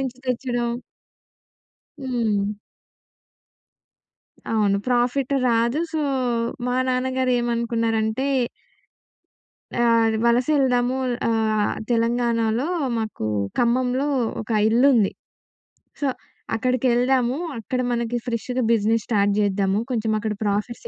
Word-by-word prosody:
నించి 255 -2 -4
తెచ్చిడం. 245 -1 -1 1.3
హ్మ్. 225 -6 -1 2.0
అవును. 205 -3 +2
ప్రాఫిట్ 250 +2 +1
రాదు. 235 +4 +2
సో, 315 - -1 0.7
మా 250 - 0
నాన్నగారు 255 0 0
ఏమనుకున్నారంటే 230 0 0 1.5
ఆహ్, 230 -1 +4
అది 220 - +1
వలసెళ్దాము. 250 0 +2 0.3
ఆహ్, 220 -2 +1 0.2
తెలంగాణలో 235 +1 +1 0.3
మాకూ 220 - -3 0.3
ఖమ్మంలో 250 +3 +1 0.3
ఒక 220 - -9 0.2
ఇల్లుంది. 235 -2 +4 0.9
సో, 285 - +1 0.5
అక్కడికెళ్దాము, 250 +2 +1 0.2
అక్కడ 250 +3 -2
మనకి 235 0 -1
ఫ్రెష్‌గా 245 +2 -2
బిజినెస్ 225 0 +2
స్టార్ట్ 205 -3 +2
చేద్దాము, 195 0 +1
కొంచమక్కడ 220 -2 -1
ప్రాఫిట్స్ 210 +3 -2
235 Hz, 85 wpm, -23 LUFS, 220-250 Hz, 2.0 s, ఆహ్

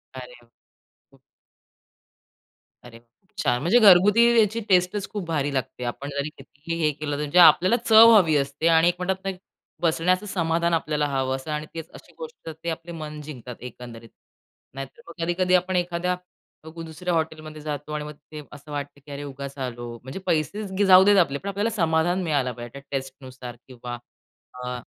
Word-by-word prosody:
अरे - - -9
वाह! - - -27 0.6
खूप - - -24 1.6
अरे 120 -2 -13
वाह! 120 - -31 0.2
खूप 195 +2 -39
छान. 120 - +2
म्हणजे 195 +11 +4
घरगुती 205 +2 +7 0.2
याची 220 +2 +2
टेस्टच 185 +2 +2
खूप 205 -4 -4
भारी 145 -3 -1
लागते. 125 -1 -3
आपण 130 +4 -5
जरी 140 +1 -3
कितीही 150 +4 -8
हे 155 -1 +3
केलं 145 0 -4
तर 145 - -4
म्हणजे 150 +4 +2
आपल्याला 175 +5 +7
चव 225 +1 +8
हवी 165 -7 +4
असते 140 +4 -1
आणि 165 +1 +5
एक 175 - +2
म्हणतात 190 +1 -2
ना, 195 - 0
की 185 - -11 0.4
बसण्याचं 180 +4 +1
समाधान 170 -3 0
आपल्याला 150 -2 0
हवं 135 -1 -1
असत 135 +3 -9
आणि 150 0 -3
त्यात 165 0 -7
अशी - - -15
गोष्ट 475 - -9
ते 170 - -2
आपले 165 +1 -6
मन 155 -2 -7
जिंकतात 125 -5 -9
एकंदरीत. 115 -2 -10 0.6
नाहीतर 135 - -9
मग 170 0 -7
कधी-कधी 180 +2 0
आपण 180 +1 +1
एखाद्या 180 0 0 0.5
ग 165 +1 -9
दुसऱ्या 175 +3 -4
हॉटेलमध्ये 155 -1 -3
जातो 150 0 -5
आणि 150 - -3
मग 150 0 -8 0.2
ते 155 -1 -7
असं 150 +1 -12
वाटतं 145 0 -6
की 145 - -11
अरे, 140 +1 -6
उगाच 140 0 -8
आलो. 120 -2 -5
म्हणजे 130 +8 -7
पैसेच 190 +6 -1
ग - - +4
जाऊ 185 0 +9
देत 205 +1 +5
आपले, 140 -7 +3
पण 200 - -6
आपल्याला 205 +3 -1
समाधान 170 0 +1
मिळायला 140 -6 0
पाहिजे, 120 0 -9
त्या - - -16
टेस्टनुसार 130 -2 -7
किंवा 120 -1 -7 0.7
अ 125 0 -4
155 Hz, 185 wpm, -24 LUFS, 140-180 Hz, 1.6 s, जाऊ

